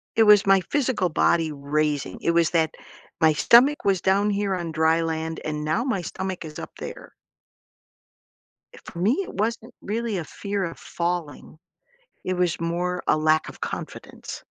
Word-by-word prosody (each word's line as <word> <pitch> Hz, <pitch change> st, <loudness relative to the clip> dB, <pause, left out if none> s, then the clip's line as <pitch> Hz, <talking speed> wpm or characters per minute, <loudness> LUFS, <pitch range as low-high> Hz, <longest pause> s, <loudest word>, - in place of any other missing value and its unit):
it 225 Hz, -, +4 dB
was 210 Hz, -2 st, +6 dB
my 195 Hz, -1 st, +5 dB
physical 255 Hz, -10 st, +1 dB
body 160 Hz, 0 st, +2 dB
raising. 145 Hz, 0 st, -2 dB
It -, -, 0 dB
was 170 Hz, -1 st, +2 dB
that 160 Hz, -2 st, +1 dB, 0.4 s
my 160 Hz, -1 st, +5 dB
stomach 255 Hz, -, +5 dB
was 195 Hz, -2 st, +2 dB
down 200 Hz, +2 st, +2 dB
here 200 Hz, -1 st, 0 dB
on 170 Hz, -3 st, -3 dB
dry 160 Hz, +1 st, +2 dB
land, 160 Hz, 0 st, -3 dB
and 150 Hz, 0 st, -3 dB
now 200 Hz, +10 st, 0 dB
my 210 Hz, -10 st, -1 dB
stomach 190 Hz, -1 st, -5 dB
is 150 Hz, -1 st, -8 dB
up -, -, -8 dB
there. -, -, -9 dB, 1.6 s
Eh, -, -, -13 dB
for -, -, -11 dB
me, 220 Hz, -, +2 dB
it -, -, -7 dB
wasn't 220 Hz, +3 st, -3 dB
really 220 Hz, -1 st, -2 dB
a 170 Hz, -, -3 dB
fear 200 Hz, +4 st, -4 dB
of 165 Hz, -2 st, -5 dB
falling. 170 Hz, -3 st, -4 dB, 0.7 s
It 185 Hz, -, -1 dB
was 175 Hz, -2 st, +1 dB
more 175 Hz, +2 st, -2 dB
a 155 Hz, -, +3 dB
lack 155 Hz, 0 st, +2 dB
of -, -, -15 dB
confidence. -, -, -7 dB
175 Hz, 170 wpm, -24 LUFS, 160-200 Hz, 1.6 s, was